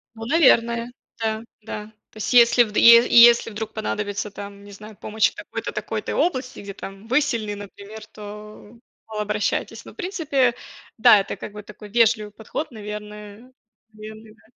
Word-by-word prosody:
Ну, 225 0 -8
наверное, 235 -5 +3 0.3
да, 220 -1 -2 0.2
да. 210 0 -8 0.2
То 215 - -14
если 240 0 +6
вд 210 -2 -6
е 235 +1 +8
если 235 -1 +7
вдруг 220 0 -6
понадобится 210 -1 -3
там, 200 0 -10
не 205 - -13
знаю, 210 +2 -12
помощь 215 +2 0
в - - -24
такой-то - - -6
такой-то - - -4
области, 255 -7 -1
где 200 0 -8
там 195 +2 -10
вы 255 +5 +3
сильны 230 -8 -2
например, 205 +1 -11
то 210 +1 -12 0.3
мол 215 -1 -6
обращайтесь. 210 0 -2
Но - - -12
в - - -27
принципе 310 - 0 0.5
да, 215 - +7
это - - -6
как - - -9
бы 210 0 -9
такой 210 0 -13
вежливый 220 -1 +2
подход, 220 +9 -6
наверное 210 +1 -9 0.4
наверное 215 0 -12
да, 215 - -27
215 Hz, 165 wpm, -22 LUFS, 210-235 Hz, 0.5 s, е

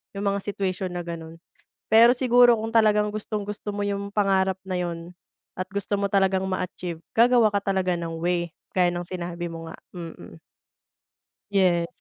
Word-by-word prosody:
Yung 200 - -4
mga 200 0 +1
situation 190 -2 -2
na 175 -1 -4
gano'n. 165 -1 -7 0.6
Pero 230 +2 +8
siguro 245 -1 +5
kung 225 +1 -4
talagang 210 -2 +4
gustong-gusto 210 -1 -4
mo 205 0 -3
yung 200 0 -3
pangarap 190 -2 +2
na 185 -1 -2
'yon 175 0 -4 0.4
at 185 0 -5
gusto 200 +1 -2
mo 200 - 0
talagang 195 -1 +2
ma-achieve 180 -2 -4 0.2
gagawa 235 -2 +5
ka 200 - +1
talaga 190 -2 0
ng 165 -1 -3
way 175 -1 0 0.2
gaya 180 -1 +3
ng 175 0 -3
sinabi 175 -1 -5
mo 165 0 -7
nga, - - -9 0.2
mm 170 -3 -7
mm. 85 -1 -12 1.1
Yes. 180 -4 +3
190 Hz, 165 wpm, -25 LUFS, 175-205 Hz, 1.1 s, Pero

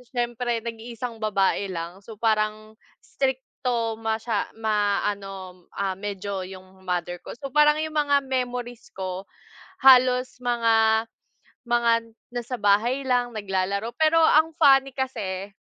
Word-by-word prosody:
siyempre, 240 -1 -1
nag-iisang 230 0 -6
babae 200 -2 +1
lang, 175 0 -6
so, 215 +2 -11
parang 215 0 -1 0.3
strikto 250 -3 -2
masya 220 -1 -2
ma, 210 -2 +1
ano, 195 -3 -6
ah, 195 -1 -2
medyo 200 -1 -4
yung 190 0 -12
mother 175 -1 -2
ko, - - -8
so, 280 - -5
parang 300 +2 +4
yung 315 0 -4
mga 290 -2 +3
memories 245 -2 -4
ko, 185 0 -5 0.6
halos 255 -1 +6
mga 225 -2 +3 0.6
mga 235 -1 +2 0.4
nasa 245 +1 -4
bahay 235 +7 +2
lang 245 -1 +2
naglalaro 200 +1 -2
pero 320 +1 +4
ang 320 0 +5
funny 270 -2 +6
kase, 205 -7 -4
225 Hz, 120 wpm, -25 LUFS, 200-250 Hz, 0.6 s, halos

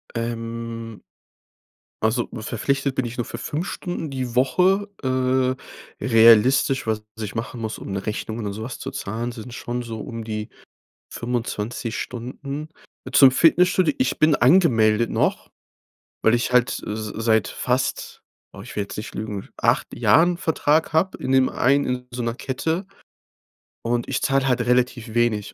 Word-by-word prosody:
Ähm. 115 -1 -5 1.0
Also 115 +2 +1
verpflichtet 130 +5 -1
bin 130 - 0
ich 120 - -7
nur 120 - -1
für 115 - -7
5 155 +8 -3
Stunden 175 -5 -4
die 130 -3 -4
Woche. 185 +10 +3
Äh, 130 0 +1 0.5
realistisch 120 +3 +5
was 110 -1 -1 0.2
ich 105 -2 -5
machen 115 +1 -5
muss, 110 -1 -3
um - - -8
'ne 100 +1 -4
Rechnung 110 +1 -3
oder 105 -3 -3
so 110 +2 -7
was 125 +2 -6
zu 135 - -6
zahlen 120 -2 -4
sind's 115 +2 -9
schon 120 +1 -4
so 115 -2 -6
um 115 +1 -6
die 110 -1 -4 0.7
25 120 -1 -3
Stunden. 140 +5 -6 0.4
Zum 135 -2 +8
Fitnessstudio: 170 +2 +4
Ich 130 - 0
bin 155 0 +5
angemeldet 115 - +4
noch, - - 0 0.7
weil 110 - +5
ich 120 +1 +1
halt 125 0 +4 0.2
s 105 0 -4
seit 110 -3 +2
fast- 125 +1 -2 0.3
oh, - - -10
ich - - -10
will 105 - 0
jetzt 100 - -9
nicht 105 - -6
lügen- 105 -2 -5
8 - - +1
Jahren 170 +2 +4
Vertrag 160 -2 +1
hab 165 +4 +2
in 130 - -3
dem 130 -1 +4
einen 140 +3 +2
in 125 0 -3
so 120 0 -4
'ner 115 0 -1
Kette. 160 +9 -3 1.0
Und, 120 0 -1
ich - - -1
zahl 135 -1 +1
halt 125 -2 +2
relativ 125 -2 0
wenig. 120 -3 +1
120 Hz, 155 wpm, -23 LUFS, 115-135 Hz, 1.0 s, Zum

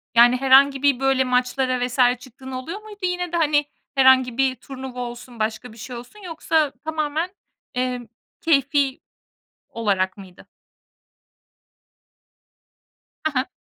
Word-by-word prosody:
Yani 240 +1 +7
herhangi 270 +1 +5
bir 280 -3 +3
böyle 270 -1 +2
maçlara 255 0 0
vs. 255 +1 -7 0.2
çıktığın 260 +1 -12
oluyor 260 +11 -6
muydu 425 -1 -12
yine 360 -1 -1
de, 340 - 0
hani, 295 -2 +2 0.3
herhangi 260 -2 +5
bir 265 -1 +2
turnuva 260 0 -8
olsun, 240 0 -7
başka 220 +2 -3
bir 225 - -16
şey 245 +3 -8
olsun 245 - -11
yoksa 320 -3 0
tamamen, 315 +2 -2 0.5
emm, 250 -1 -2 0.3
keyfi 280 -3 +2 0.7
olarak 195 -4 -1
mıydı? 190 -3 -14 2.8
He 315 - +2
he. 255 0 0
260 Hz, 125 wpm, -22 LUFS, 245-290 Hz, 2.8 s, Yani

